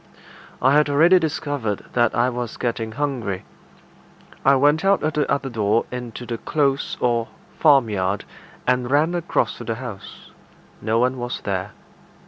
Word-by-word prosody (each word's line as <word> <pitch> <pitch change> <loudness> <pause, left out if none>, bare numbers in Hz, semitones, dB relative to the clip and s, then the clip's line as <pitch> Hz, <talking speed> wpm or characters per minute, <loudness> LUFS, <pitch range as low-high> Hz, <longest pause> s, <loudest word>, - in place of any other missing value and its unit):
I 135 +2 +5
had 150 0 +4
already 165 +6 +5
discovered 145 - -2
that 120 -1 +2
I 120 +1 +3
was 120 -1 -5
getting 115 -2 -2
hungry. 125 -8 -3 1.0
I 140 +1 +5
went 145 +5 +3
out 195 0 +3
at 155 0 0
the 150 - 0
other 140 -1 0
door 110 -2 +1
into 125 -1 -6
the 115 -1 -4
close 140 -3 0
or 120 -2 +1 0.3
farmyard, 105 - +3 0.4
and 125 -1 +1
ran 150 +5 +3
across 175 -1 -1
to - - -6
the 115 -1 -3
house. 110 -5 -9 0.5
No 110 +1 0
one 125 +2 +1
was 120 0 -4
there. - - -3
125 Hz, 150 wpm, -22 LUFS, 115-145 Hz, 1.0 s, I